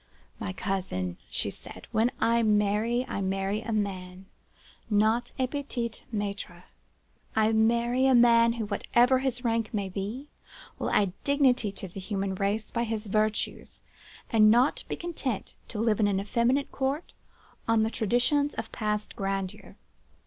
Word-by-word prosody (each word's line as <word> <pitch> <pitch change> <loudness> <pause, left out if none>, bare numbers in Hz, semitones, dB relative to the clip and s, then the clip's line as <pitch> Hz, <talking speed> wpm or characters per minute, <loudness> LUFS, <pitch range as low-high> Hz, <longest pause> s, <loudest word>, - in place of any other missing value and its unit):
'My 95 - -3
cousin,' 95 - -3
she - - -1
said, - - -11
'when 225 +2 +3
I 235 0 +3
marry, 215 +3 +2
I 200 - -3
marry 195 +2 -1
a 230 - -5
man, 190 -3 -3 0.6
not 220 +3 +2
a 260 - +2
petit 255 -4 -3 0.2
maitre. 200 -4 -4 0.7
I 220 0 +3
marry 235 +3 +3
a 265 - +5
man 235 -1 +6
who, 230 -2 -3
whatever 240 +5 +3
his 260 -2 -2
rank 230 -2 0
may 200 -4 -2
be 210 +9 -5 0.5
will - - -1
add 200 -3 +2
dignity 260 -7 +3
to 195 - -6
the 185 +2 -9
human 195 0 -2
race 200 +3 -1
by 235 - 0
his 225 -1 -3
virtues, 215 +1 -1 0.5
and 215 -2 +6
not 245 +5 +3
be - - -3
content 300 - -4
to 210 - -6
live 220 -1 +2
in 210 - +4
an 195 -1 +1
effeminate 235 +7 +1
court 275 +4 -2 0.5
on 225 -1 +4
the 220 - 0
traditions 245 +7 +1
of - - -5
past 210 -2 -2
grandeur. 195 -1 -4
220 Hz, 150 wpm, -28 LUFS, 200-240 Hz, 0.7 s, man